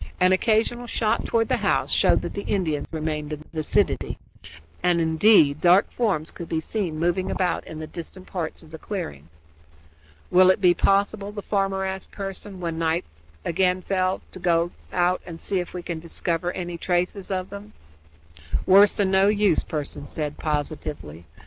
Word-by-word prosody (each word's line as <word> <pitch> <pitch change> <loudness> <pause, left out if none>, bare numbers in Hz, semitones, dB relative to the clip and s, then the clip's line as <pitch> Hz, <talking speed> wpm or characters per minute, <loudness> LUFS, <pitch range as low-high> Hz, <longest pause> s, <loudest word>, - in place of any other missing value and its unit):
An 185 0 +5
occasional 225 +4 +1
shot 220 -2 0
toward 225 -1 +1
the - - +1
house - - +1
showed - - +3
that - - -4
the 200 - -3
Indians 160 -7 -1
remained 155 -1 -3
in 150 - -6
the - - -16
vicinity 155 - 0 0.6
and, 175 -1 +3
indeed, 160 -2 +4
dark 180 +3 +5
forms 190 -10 -1
could 170 - -9
be 160 - 0
seen 170 -2 -3
moving 175 +3 0
about 180 -2 -1
in 160 - -8
the 155 - -5
distant 180 +3 -9
parts 170 -3 -5
of 160 - -16
the 160 - -8
clearing. 80 - -6 1.0
"Will 185 +1 +7
it 185 - +4
be 180 -3 +5
possible," 200 +2 +1
the 205 -1 -7
farmer 195 -1 0
asked 190 0 -5
Pearson, 195 -1 -7
when 165 -2 -3
night 165 +1 0 0.4
again 180 +1 +1
fell, 185 0 0
"to - - -10
go 170 -1 +2 0.2
out 180 0 +1
and 165 -2 -9
see 190 +2 -1
if 175 - -5
we 180 -1 -6
can 170 -2 -4
discover 170 +1 -2
any 175 -1 -5
traces 180 +3 -1
of 185 -1 -3
them?" 200 +1 -9 0.9
"Worse 200 +2 +6
than 195 -2 +1
no 190 +1 +5
use," 205 -5 +3
Pearson 145 -1 -5
said 150 -1 -3
positively. 145 - -4
180 Hz, 175 wpm, -24 LUFS, 160-195 Hz, 1.0 s, Will